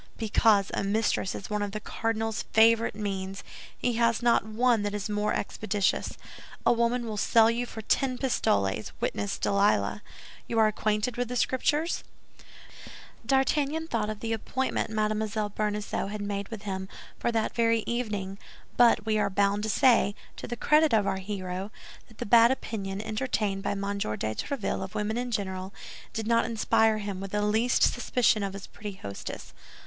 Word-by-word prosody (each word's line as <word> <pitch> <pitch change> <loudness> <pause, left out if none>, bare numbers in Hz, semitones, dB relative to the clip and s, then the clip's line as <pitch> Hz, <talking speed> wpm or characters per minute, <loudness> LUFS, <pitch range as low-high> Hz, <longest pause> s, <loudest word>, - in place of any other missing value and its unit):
"Because 215 -2 +3
a - - -1
mistress 200 -1 0
is 200 - -7
one 210 0 0
of 205 -1 -3
the 215 - -3
cardinal's 225 0 -2
favorite 225 0 +5
means; 195 -2 -4 0.3
he 240 -2 -1
has 230 0 +2
not 235 -4 +4
one 225 +2 +2
that 205 0 -2
is 205 0 -3
more 210 0 0
expeditious. 205 -1 -1 0.5
A - - +6
woman 235 +1 +1
will 215 -2 -4
sell 225 +2 +5
you 240 +1 -2
for 220 - -8
ten 255 +3 +1
pistoles, 100 - 0
witness 100 -1 -2
Delilah. 200 +1 +1 0.5
You 230 - -2
are 220 - +6
acquainted 215 +2 0
with 245 0 -1
the 250 - -4
Scriptures?" 295 +6 +1 1.2
D'Artagnan 285 +3 +1
thought 220 -7 -1
of 215 -1 -5
the 225 0 -1
appointment 260 +3 -2
Mme. 215 0 0 0.3
Bonacieux 210 -1 -2
had 210 +1 -5
made 200 -1 -3
with 220 -2 -8
him 190 -2 -4 0.3
for 235 - 0
that 225 -1 0
very 230 -1 +2
evening; 205 -5 -3 0.4
but 235 -3 +5
we 215 -1 +1
are - - +1
bound 200 +1 +1
to 220 - -2
say, 225 -4 +4 0.2
to - - -7
the 240 - -4
credit 305 +1 +4
of 210 -2 +3
our 190 - 0
hero, 190 -1 -4 0.4
that 220 - -19
the - - -4
bad 230 +2 +7
opinion 200 -6 -3
entertained 215 -3 -1
by - - -1
M. 195 - -4 0.2
de - - -1
Tréville 110 - -2
of 190 - -8
women 210 +1 -1
in 250 0 -3
general, 190 -3 -3 0.4
did 220 - -4
not 230 +1 +3
inspire 220 -1 +2
him 200 -3 -4
with 195 - -5
the 210 +1 -1
least 220 +4 +2
suspicion 245 -3 +2
of 195 -1 -2
his 195 -1 -7
pretty 205 -1 -8
hostess. 100 - -8
215 Hz, 175 wpm, -28 LUFS, 200-230 Hz, 1.2 s, bad